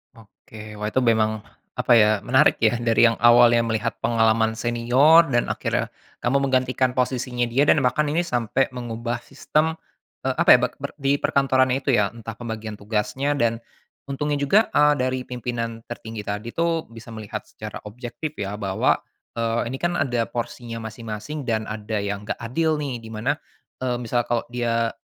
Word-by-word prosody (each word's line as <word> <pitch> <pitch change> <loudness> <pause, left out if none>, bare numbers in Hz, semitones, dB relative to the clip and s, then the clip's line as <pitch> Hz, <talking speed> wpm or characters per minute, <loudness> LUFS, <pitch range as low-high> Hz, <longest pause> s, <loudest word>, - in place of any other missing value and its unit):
Oke 110 -1 -13
wah 105 +1 -4
itu - - +2
memang, 110 -3 +2 0.3
apa 120 - +3
ya 110 -2 +5
menarik 125 +6 +3
ya 115 +1 +3
dari 115 0 +5
yang 115 - +1
awalnya 120 0 +6
melihat 115 0 -1
pengalaman 110 -1 +2
senior 125 +8 +5
dan 120 -1 +1
akhirnya - - -1 0.3
kamu 140 +3 +1
menggantikan 130 -1 +1
posisinya 125 -1 -1
dia 125 +4 +2
dan 145 - +4
bahkan 135 +3 +2
ini 165 - +1
sampai 125 -5 0
mengubah 120 0 -4
sistem, 155 +3 -1 0.5
eee, - - 0
apa - - +2
ya - - +9
be - - +1
ber - - -6
di 140 0 +2
perkantoran 130 -2 +2
itu 135 0 +1
ya 105 -2 +2
entah 115 -1 -8
pembagian 110 -2 -6
tugasnya 105 +7 -2
dan, 115 0 0 0.4
untungnya 145 +2 -2
juga, 170 +11 +3
eee, 150 0 +5
dari 130 0 0
pimpinan 120 -2 -4
tertinggi 110 -3 -7
tadi 105 +3 -4
tuh 165 +1 0
bisa 115 +1 -12
melihat 110 -2 -7
secara 110 0 -8
objektif 125 +7 -7
ya 100 +1 -5
bahwa, 95 -2 +1 0.4
eee, 115 0 0
ini 135 - -5
kan 175 0 0
ada 120 -7 0
porsinya 120 0 -5
masing-masing 115 +6 -6
dan 110 -1 0
ada 105 -1 -3
yang 100 0 -4
nggak - - -1
adil 155 +7 -1
nih 140 -5 -4
di 115 - -12
mana, 115 +7 -2 0.4
eee, 125 -1 -1
misal 120 0 -1
kalau 120 -1 0
dia 115 -1 0
120 Hz, 170 wpm, -23 LUFS, 110-130 Hz, 0.5 s, ya